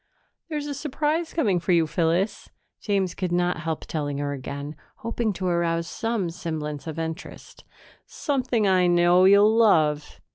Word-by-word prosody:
"There's 300 -2 -3
a 290 - -4
surprise 300 +3 -2
coming 205 - +1
for 180 +2 0
you, 165 -2 +4
Phyllis," 170 +6 -1 0.3
James 195 -4 -1
could 185 -2 -3
not 175 0 +1
help 160 -1 -4
telling 145 -3 -3
her 145 0 -2
again, 140 +2 -6 0.3
hoping 230 -1 -1
to 185 0 -5
arouse 170 -1 0
some 225 -7 -2
semblance 155 -3 -5
of 160 0 -5
interest. 165 +2 -7 0.4
"Something 255 -7 -1
I 185 -2 +4
know 175 +1 +4
you'll 205 +3 +6
love.... 155 -10 +2
180 Hz, 150 wpm, -25 LUFS, 160-220 Hz, 0.4 s, you'll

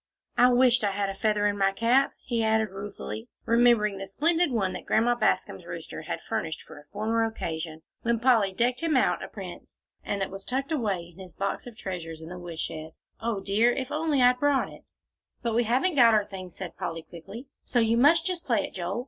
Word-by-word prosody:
"I 250 - +6
wished 250 -1 +4
I 200 -1 +1
had 200 0 -1
a - - -3
feather 210 +1 +1
in 205 -1 +1
my 195 0 +4
cap," 235 +7 +3
he 235 -3 -1
added 220 0 +2
ruefully, 205 +4 -7 0.2
remembering 230 -4 +4
the 195 - -5
splendid 330 - +2
one 200 -7 0
that - - -8
Grandma 235 +2 +3
Bascom's 240 - 0
rooster - - -7
had - - -5
furnished 170 -8 -3
for - - -12
a 145 - -18
former 220 +3 0
occasion, 160 -7 -4 0.2
when 235 0 +1
Polly 230 -5 +4
decked 245 +7 0
him 325 -4 +2
out - - +2
a - - -5
prince, - - -10 0.2
and 200 - -2
that 195 -1 -2
was 195 0 -7
tucked 270 +6 -2
away 200 - -1
in 175 - -18
his 180 -4 -11
box 200 +4 -3
of 235 -3 -11
treasures 165 -4 -6
in 160 - -9
the 180 0 -7
woodshed, 160 -2 -5 0.3
"O 225 -3 -2
dear! 210 +5 +3
if 265 +1 -4
I'd - - -1
only 305 -4 +2 0.2
brought 285 -1 +2
it!" - - -15 0.6
"But 235 -1 0
we 235 +1 +2
haven't 260 +11 +2
got 235 -5 +6
our 210 -1 +2
things," 185 -3 -9
said 175 -3 -7
Polly, 165 -3 -4
quickly, 195 - -10 0.2
"so 245 - +1
you 225 0 +3
must 310 +7 +5
just 365 -2 -3
play 230 -6 +2
it, - - -10
Joel. 185 +4 -3
220 Hz, 215 wpm, -27 LUFS, 195-245 Hz, 0.6 s, I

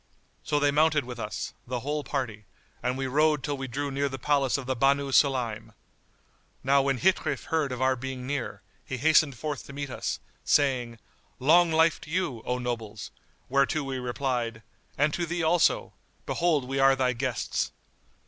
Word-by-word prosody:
So 145 - +1
they 145 0 +3
mounted 150 -1 +3
with 120 -1 -7
us, 105 -1 -4
the 125 0 -3
whole 145 +3 -2
party, 115 -8 -3 0.4
and 125 +1 -1
we 135 - -2
rode 150 +2 +2
till 145 - -1
we 135 -1 -5
drew 140 +3 -3
near 140 +1 0
the 130 - -5
place 140 0 +1
of 135 - -6
the 130 +1 -1
Banu 140 +2 +2
Sulaym. 115 -6 +1 0.9
Now 140 +1 +4
when 135 -1 +1
Ghitrif 155 -5 +1
heard 155 -4 0
of 125 +1 -2
our 130 0 +3
being 130 0 -6
near, 130 -7 -4 0.2
he 130 - -5
hastened 150 -1 +4
forth 145 +2 -4
to 140 - -10
meet 140 -1 -5
us, - - -3 0.2
saying, 125 -5 +2 0.4
"Long 165 +6 +5
life 160 0 +3
to - - -11
you, 165 -9 -1
O 125 - 0
nobles!"; 115 -4 -5 0.4
whereto 140 +3 +2
we 135 -1 -3
replied, 120 -3 -2 0.3
"And 145 +1 +2
to 175 -1 -1
thee 170 +1 -2
also! 165 +1 +2 0.3
Behold 160 -6 +1
we 135 +1 -2
are 135 0 +6
thy 130 -1 +1
guests." 125 -1 -2
135 Hz, 175 wpm, -27 LUFS, 125-145 Hz, 0.9 s, are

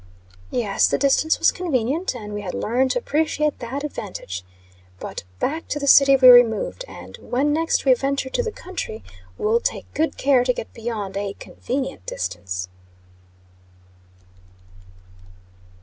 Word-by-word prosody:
Yes, 210 -5 +1
the - - +1
distance 280 +3 +2
was - - +4
convenient; 305 -2 -1
and 210 -3 -7
we 205 - -4
had 185 -3 -5
learned 255 +4 +1
to - - 0
appreciate 305 - 0
that 265 +4 -5
advantage. 180 - -6 0.6
But - - -7
back 315 - -2
to 295 - -2
the 285 - -3
city 275 0 +7
we 260 -1 +6
removed; 245 - +6
and, - - -11
when 280 +4 0
next 325 0 0
we 265 - +7
venture 270 +1 -2
to - - +1
the 455 -2 -3
country, 365 - -7 0.3
will 220 +2 +2
take - - -3
good 320 +2 -1
care 265 -3 +3
to 250 0 +1
get 225 - -7
beyond 220 -4 -4
a 200 0 -3
convenient 255 - -5
distance. 90 0 -4
255 Hz, 145 wpm, -22 LUFS, 210-290 Hz, 0.6 s, city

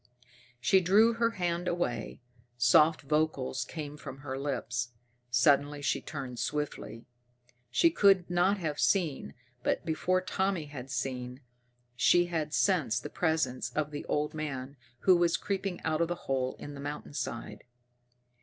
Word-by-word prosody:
She 190 +10 +4
drew 210 +6 +5
her 230 0 +2
hand 175 0 -1
away. 125 -12 -2 0.4
Soft 150 +7 +5
vocals 145 -3 0
came 150 +1 -7
from 135 -2 -9
her 130 -1 -3
lips. 125 -3 -3 0.4
Suddenly 145 +3 +3
she - - 0
turned 130 -5 -6
swiftly. 140 -3 -3 0.6
She 335 - +4
could 195 - +4
not 180 +3 +2
have 155 -5 -3
seen, 170 -8 +1 0.3
but - - -1
before 170 +3 +1
Tommy 185 -2 -1
had 135 -3 -8
seen, 125 0 -4 0.5
she 175 +7 +4
had 160 -3 -2
sensed 135 - +1
the - - -6
presence 160 -7 0
of 150 +1 -1
the 145 - -5
old 150 0 -1
man 140 -3 -5 0.3
who 185 - +6
was 170 -1 +3
creeping 195 -2 -3
out 160 0 0
of 170 - +2
the 175 - -2
hole 130 -1 -1
in 145 - -8
the 140 - -8
mountainside. 140 -4 -5
150 Hz, 145 wpm, -30 LUFS, 130-175 Hz, 0.6 s, who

